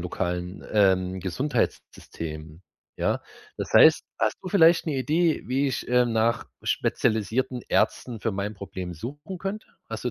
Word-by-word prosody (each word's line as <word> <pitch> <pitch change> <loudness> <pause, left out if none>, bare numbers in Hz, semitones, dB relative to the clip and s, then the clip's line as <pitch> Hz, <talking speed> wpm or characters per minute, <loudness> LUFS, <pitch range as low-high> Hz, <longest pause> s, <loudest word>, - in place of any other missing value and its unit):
lokalen, 90 +1 -3
ähm, 95 -2 +3
Gesundheitssystem, 85 - -4 0.3
ja? - - 0 0.3
Das - - -5
heißt, - - +7
hast - - +1
du 185 - -5
vielleicht 165 -3 +5
'ne 145 -3 -1
Idee, 160 +5 +1
wie 135 +3 +1
ich, 130 - -3
äh, 125 0 +4
nach 115 0 +1 0.2
spezialisierten 110 +4 0
Ärzten 120 -3 0
für 115 - -1
mein 100 +2 -3
Problem 95 -2 -6
suchen 145 - -7
könnte? 195 +4 -5 0.2
Hast - - -6
du - - 0
115 Hz, 145 wpm, -26 LUFS, 95-145 Hz, 0.3 s, heißt